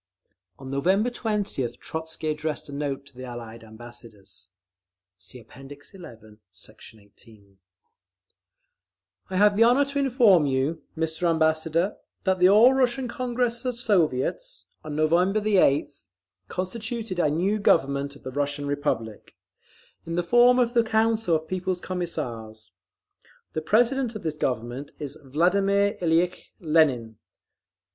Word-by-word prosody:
On 135 0 -9
November 190 - +1
20th 205 - -2
Trotzky 160 0 -5
addressed 155 0 -3
a - - -10
note 140 -1 -4
to 140 - -20
the 130 - -9
Allied 115 -2 -9
Ambassadors: 110 -4 -14 0.7
(See 95 +7 -12
App. 115 - -20
XI, 145 +8 -13 0.5
Sect. 95 +4 -14
18) 100 -1 -20 1.7
I 190 - -5
have 205 +1 +4
the 225 - +5
honour 250 +5 +4
to 280 0 -3
inform 235 - +4
you, 140 +4 -1 0.2
Mr. 160 +2 -1
Ambassador, 160 +3 +1 0.3
that 190 -2 +1
the 180 +1 +6
All 225 +6 +7
Russian 260 0 +1
Congress 240 0 -2
of 250 -2 -2
Soviets… 215 - -1 0.2
on 155 -1 -6
November 175 +7 +2
8th 150 - +1 0.4
constituted 215 - -4
a 155 - +3
new 185 +8 0
Government 140 -6 +1
of - - -17
the 130 - -6
Russian 145 +1 -2
Republic, 115 -6 -3 0.7
in 165 - -3
the 175 - 0
form 240 +6 +5
of 240 -1 +2
the 235 - +4
Council 220 -4 +1
of 160 0 -3
People's 185 0 -2
Commissars. 120 - -5 0.8
The 155 - -2
President 240 - +1
of 215 - -7
this 160 -2 -3
Government 130 0 -3
is 145 -3 -7
Vladimir 195 +8 +1
Ilyitch 175 +1 0
Lenin. 140 - +1
160 Hz, 130 wpm, -25 LUFS, 135-210 Hz, 1.7 s, All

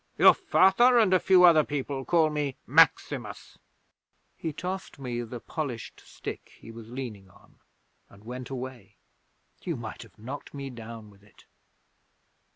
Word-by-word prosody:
Your - - +8
Father 240 +7 +4
and 215 -5 +4
a 185 - +5
few 185 -1 +5
other 165 -3 +7
people 140 -2 -4
call 160 -3 +3
me 145 -3 -2
Maximus." - - +1 0.8
'He 160 - -4
tossed 185 +4 -6
me 125 -3 -4
the 120 +1 -7
polished 130 -4 -6
stick - - -9
he 115 - -11
was 115 -1 -11
leaning 115 -7 -7
on, - - -23 0.5
and 100 +1 -18
went 125 +2 -7
away. 130 -5 -7 0.7
You 170 - -3
might 115 -3 -7
have 115 -4 -15
knocked 130 +7 -8
me 140 -1 -6
down 115 -2 -10
with 100 0 -21
it!' 105 0 -22
130 Hz, 150 wpm, -27 LUFS, 115-155 Hz, 0.8 s, Your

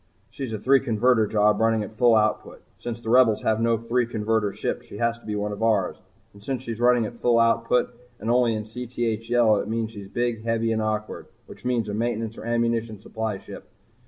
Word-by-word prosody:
"She's 130 -1 -5
a 110 - -2
three 135 +6 +4
converter 120 -2 +2
job 105 0 +2
running 115 -1 +2
at 105 - -8
full 115 +1 +4
output. 110 -1 0
Since 120 -1 -6
the 115 - -3
Rebels 120 -4 +4
have 110 0 +1
no 115 0 +2
three 115 +1 0
converter 110 -2 0
ships, - - -4
she - - -9
has 115 0 0
to - - -17
be 105 - -2
one 105 0 -2
of 105 +1 -6
ours. 105 -5 +1 0.4
And 100 - -16
since 130 +3 -4
she's 115 -3 -5
running 120 -1 +4
at 115 +1 -8
full 120 -1 +3
output 115 +2 +2 0.3
and 110 +3 -1
only 120 -2 +3
in 105 - -3
Cth 125 +2 -9 0.3
yellow, 120 -3 +4
it - - -4
means 115 0 -2
she's 100 -3 -9
big, 120 +1 -2
heavy, 115 0 0
and 110 0 0
awkward 110 0 -3 0.2
which - - -14
means 120 -3 0
a 105 - -4
maintenance 115 0 -2
or - - -9
an 120 - -1
ammunition 115 -2 0
supply 110 0 -4
ship. - - -11
115 Hz, 220 wpm, -24 LUFS, 110-120 Hz, 0.4 s, three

